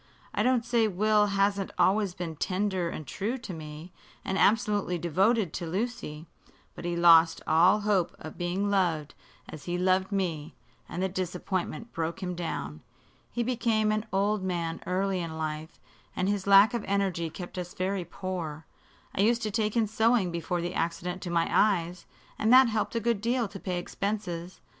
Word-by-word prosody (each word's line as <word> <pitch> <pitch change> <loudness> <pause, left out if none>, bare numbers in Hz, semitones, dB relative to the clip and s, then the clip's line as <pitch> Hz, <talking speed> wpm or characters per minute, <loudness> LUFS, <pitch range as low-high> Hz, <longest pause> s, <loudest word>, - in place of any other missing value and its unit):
I - - 0
don't 250 -2 +2
say 235 -2 +2
Will 210 +2 +3
hasn't 200 0 +1
always 195 -1 +2
been 170 -3 -5
tender 185 +1 -1
and 155 - -6
true 215 - -3
to 235 -7 -7
me, 155 +2 -9 0.3
and 190 - -1
absolutely 205 -3 +2
devoted 185 +3 +1
to 170 - -4
Lucy. 180 -5 -4 0.5
But - - -9
he 175 0 -1
lost 165 -1 +6
all 180 +6 +4
hope 205 -4 +1
of 155 - -9
being 185 +4 -1
loved 170 -7 +1 0.3
as 155 - -10
he 175 0 -2
loved 185 +2 +2
me, 170 -6 -2 0.3
and 180 - -3
the - - +2
disappointment 185 +4 -3
broke 165 +2 -3
him 180 -1 -2
down. 80 - -5 0.5
He 240 - -1
became 225 -3 +1
an 215 +1 -1
old 200 +2 +1
man 170 -3 -2
early 190 +1 0
in 165 -2 -5
life, 155 0 -5 0.4
and 185 - 0
his 200 -1 -1
lack 200 +3 +7
of 235 -3 -2
energy 190 -4 0
kept 175 +2 -7
us 180 0 -6
very 190 0 -1
poor. 170 -3 -5 0.5
I - - 0
used 230 +2 +3
to 215 - -1
take 215 +1 0
in 225 - +4
sewing 220 -3 +2
before 170 +1 -2
the 175 +1 -3
accident 175 +2 -2
to 180 - -5
my 170 -1 +1
eyes, 180 -4 +1 0.3
and 220 - +2
that 255 -1 +8
helped 220 +1 -1
a - - +2
good 230 -2 0
deal 235 +1 +1
to 195 0 -9
pay 185 -2 -3
expenses. 180 -2 -4
185 Hz, 175 wpm, -28 LUFS, 170-210 Hz, 0.5 s, that